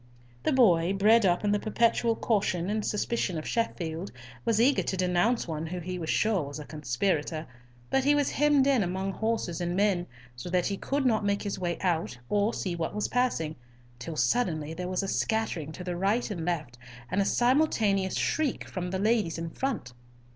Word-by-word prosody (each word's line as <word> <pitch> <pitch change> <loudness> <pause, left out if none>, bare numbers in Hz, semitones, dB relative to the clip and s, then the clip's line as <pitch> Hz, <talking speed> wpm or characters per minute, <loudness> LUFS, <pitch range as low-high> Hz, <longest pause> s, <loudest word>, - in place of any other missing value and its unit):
The - - +1
boy, 190 -9 +4
bred 210 +2 +5
up 175 +2 +1
in 205 - +2
the 205 - +2
perpetual 230 +1 +2
caution 195 -5 0
and 215 0 -1
suspicion 210 -4 -1
of 155 - -5
Sheffield, 175 -6 -2 0.3
was 225 -2 +2
eager 265 +4 +4
to 190 - -3
denounce 180 +6 +1
one 160 0 -3
who 180 +3 -4
he 180 +1 -5
was 160 -2 -4
sure 215 -4 +2
was 145 0 -6
a 150 - -7
conspirator; 155 +3 -1 0.5
but 270 - +3
he 290 +2 +4
was 290 -1 +1
hemmed 295 -2 +3
in 275 -4 +3
among 190 +1 -1
horses 220 -5 -2
and 175 0 -1
men, 190 -3 +1 0.3
so 125 +8 -7
that 180 0 +1
he 200 - -1
could 275 +7 -2
not 220 -4 +2
make 200 0 0
his 200 -2 -3
way 175 -2 -1
out 170 -8 0
or 205 +2 +2
see 185 -6 -3
what 170 +3 -3
was 210 - -1
passing, 230 -11 0 0.4
till 155 +6 -6
suddenly 160 -7 0
there 180 +2 -4
was 185 +1 -1
a - - -2
scattering 190 -9 -1
to 180 - -7
the 180 -1 -3
right 205 +6 0
and 170 -5 -4
left, 150 -9 -3 0.3
and 200 - +2
a - - +4
simultaneous 220 -6 +2
shriek 310 -5 0
from 180 -2 -4
the 190 - -2
ladies 210 -4 +1
in 165 0 -4
front. 235 - -3
190 Hz, 195 wpm, -28 LUFS, 170-225 Hz, 0.5 s, bred